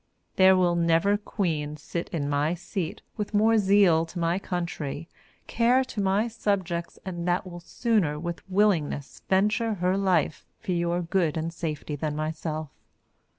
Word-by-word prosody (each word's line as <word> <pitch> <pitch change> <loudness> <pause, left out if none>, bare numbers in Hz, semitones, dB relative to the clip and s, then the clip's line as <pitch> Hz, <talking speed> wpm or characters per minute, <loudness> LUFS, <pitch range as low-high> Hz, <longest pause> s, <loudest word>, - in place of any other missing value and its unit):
There 190 0 +6
will 175 -1 +3
never 170 +4 +3
Queen 160 -8 -2
sit 170 +3 -5
in 145 -4 -2
my 145 +3 +1
seat 175 -1 -5
with 210 0 -3
more 220 +2 +4
zeal 195 -5 +4
to 170 - -10
my 170 +2 +1
country, 170 -5 -4 0.4
care 245 +3 +3
to 250 -5 -4
my 195 +4 +2
subjects 190 -7 -2
and 175 -2 -4
that 175 +1 +1
will 175 -1 -8
sooner 180 -5 0
with 170 +1 -5
willingness 185 -8 +1
venture 210 +4 +2
her 180 0 +1
life 190 -5 +1 0.2
for - - -4
your 175 0 0
good 170 -2 0
and 165 +1 -3
safety 155 -3 -4
than 150 +1 -3
myself. 155 0 -3
175 Hz, 150 wpm, -26 LUFS, 160-200 Hz, 0.4 s, There